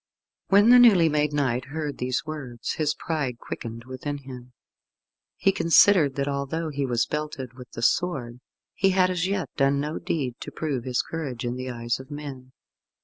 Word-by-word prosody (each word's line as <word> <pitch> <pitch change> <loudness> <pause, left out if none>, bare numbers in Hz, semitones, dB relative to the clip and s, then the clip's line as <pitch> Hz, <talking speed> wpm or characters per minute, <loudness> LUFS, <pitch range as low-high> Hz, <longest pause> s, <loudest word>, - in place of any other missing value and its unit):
When 205 +4 +6
the 250 - +9
newly 195 -9 +7
made 150 -1 +1
knight 130 -4 0
heard 145 +1 -5
these 125 +3 -1
words 135 -7 -5
his 150 -1 0
pride 140 -7 -3
quickened 115 0 -7
within 130 +3 -5
him. 125 -2 -11 0.8
He 195 - +3
considered 165 -4 +5
that 140 0 -1
although 140 +4 -2
he 140 -2 -2
was 120 -2 +1
belted 150 -4 -4
with 125 -1 -12
the 115 - -5
sword, 125 -6 0 0.3
he 195 - +2
had 185 0 +4
as 180 0 0
yet 195 -2 -2
done 140 0 +3
no 150 +3 -3
deed 140 -8 -2
to - - -6
prove 140 -6 -3
his 125 -2 0
courage 135 -8 -5
in 120 0 -2
the 130 0 -5
eyes 120 -1 -2
of 130 - -11
men. 140 -3 -8
140 Hz, 180 wpm, -25 LUFS, 125-160 Hz, 0.8 s, the